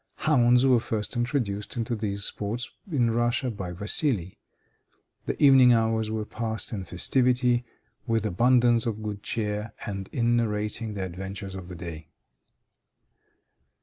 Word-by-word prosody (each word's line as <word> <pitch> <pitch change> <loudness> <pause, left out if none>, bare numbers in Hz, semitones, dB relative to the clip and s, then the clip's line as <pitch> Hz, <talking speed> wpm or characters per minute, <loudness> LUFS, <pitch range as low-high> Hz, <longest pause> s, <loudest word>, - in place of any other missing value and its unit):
Hounds 125 -4 +3
were 130 -3 +5
first 110 +1 -3
introduced 120 -4 -2
into 115 0 -1
these 100 -2 -3
sports 110 +6 -2 0.2
in 120 -6 +2
Russia 120 +2 0
by 95 -5 -6
Vassili. 100 - 0 0.9
The - - -3
evening 130 -3 +7
hours 110 -1 +1
were 110 -1 -3
passed 110 +1 -2
in 95 -3 -4
festivity, 125 +5 +2 0.4
with 115 -2 0
abundance 120 +3 +3
of 110 -1 -3
good 105 -2 -5
cheer, 105 0 -3
and 95 -3 -5
in 120 0 +1
narrating 105 -1 -2
the 100 - -3
adventures 95 +2 -6
of 95 -2 -8
the 90 - -8
day. 80 -2 -8
110 Hz, 135 wpm, -26 LUFS, 100-120 Hz, 0.9 s, evening